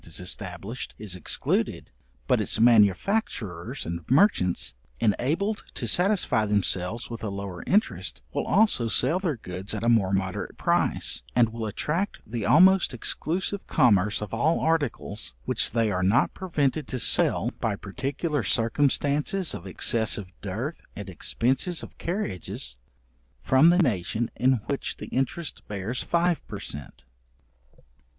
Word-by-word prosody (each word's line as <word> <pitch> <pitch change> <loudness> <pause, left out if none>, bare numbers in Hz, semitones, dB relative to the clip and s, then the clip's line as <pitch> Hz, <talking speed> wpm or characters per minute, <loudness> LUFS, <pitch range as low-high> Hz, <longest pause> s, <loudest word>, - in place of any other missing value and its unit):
is 80 - -5
established, 95 +5 -5
is 105 -4 -3
excluded, 90 - 0 0.3
but - - +2
its - - 0
manufacturers 115 - +2
and 85 0 -5
merchants, 130 - +2 0.3
enabled 165 - 0
to - - -3
satisfy 180 - +3
themselves 105 +2 0
with 115 - -7
a 110 - -2
lower 100 -3 -6
interest, 210 +3 0
will - - -2
also 205 - +3
sell 160 - +3
their 175 -7 -1
goods 95 +1 -5
at - - -5
a - - +3
more 105 -5 +3
moderate 95 0 -2
price, - - 0
and 120 -2 +4
will 115 -1 -4
attract 165 - -2
the 115 0 -4
almost 185 -3 +5
exclusive 180 - -1
commerce 105 - +3
of 105 - -8
all 145 +9 +1
articles, 140 - -2
which - - +3
they 115 -2 0
are 90 -1 -1
not 105 +10 +2
prevented 155 -5 -1
to 130 - -3
sell 115 - +3
by 110 -3 -1
particular 140 - -3
circumstances 145 - +1
of 90 - -7
excessive 105 0 +2
dearth, 115 - -5
and 100 -1 -7
expences 130 - 0
of - - -11
carriages, 95 - -4 0.7
from 135 - +5
the 175 - +4
nation 115 - 0
in 130 +1 +3
which 140 - -3
the - - -8
interest 135 +5 -2
bears 105 +4 -4
five 175 0 +1
per - - -7
cent. 70 -1 -9
115 Hz, 140 wpm, -26 LUFS, 100-155 Hz, 0.7 s, almost